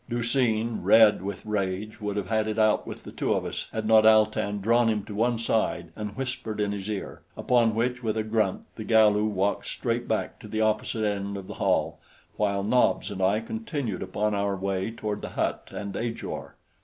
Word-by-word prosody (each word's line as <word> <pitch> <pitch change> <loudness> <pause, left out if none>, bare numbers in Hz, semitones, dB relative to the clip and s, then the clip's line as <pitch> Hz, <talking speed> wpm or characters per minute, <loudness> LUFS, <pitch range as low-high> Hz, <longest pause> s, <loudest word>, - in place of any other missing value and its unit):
Du 120 0 -1
seen, 115 -2 +1
red 110 -4 +6
with 100 +1 -6
rage, 105 +1 -3
would 105 -1 -3
have 100 -3 -2
had 110 -1 +1
it 110 0 -2
out 110 -1 +3
with - - -8
the - - -9
two - - 0
of - - -2
us - - -4
had 110 -1 -3
not 110 0 +6
Al 110 0 +7
tan 105 -1 -3
drawn 115 +3 +3
him 105 -2 0
to 105 - -8
one 115 +3 +1
side 110 -7 -1
and 105 -1 -6
whispered 125 -5 -4
in 105 -1 +1
his 100 0 -5
ear 105 -2 -5 0.2
upon 115 -3 +2
which, 125 +2 0
with 110 -2 -1
a 110 - 0
grunt, 110 -3 0
the 110 - -5
Galu 105 -1 +4
walked 100 -1 0
straight - - -2
back - - -2
to - - -10
the 110 +1 -3
opposite 110 0 0
end 100 -1 -2
of 100 - -7
the - - -7
hall, - - +1 0.4
while 100 -2 0
Nobs 125 +1 +2
and 95 -1 -5
I 100 +4 +2
continued 145 - -4
upon 105 +3 -1
our 100 -1 0
way 95 +1 -2
toward 105 -2 -4
the - - -5
hut - - -1
and 100 -1 -5
Ajor. 115 0 -5
110 Hz, 210 wpm, -26 LUFS, 100-115 Hz, 0.4 s, Al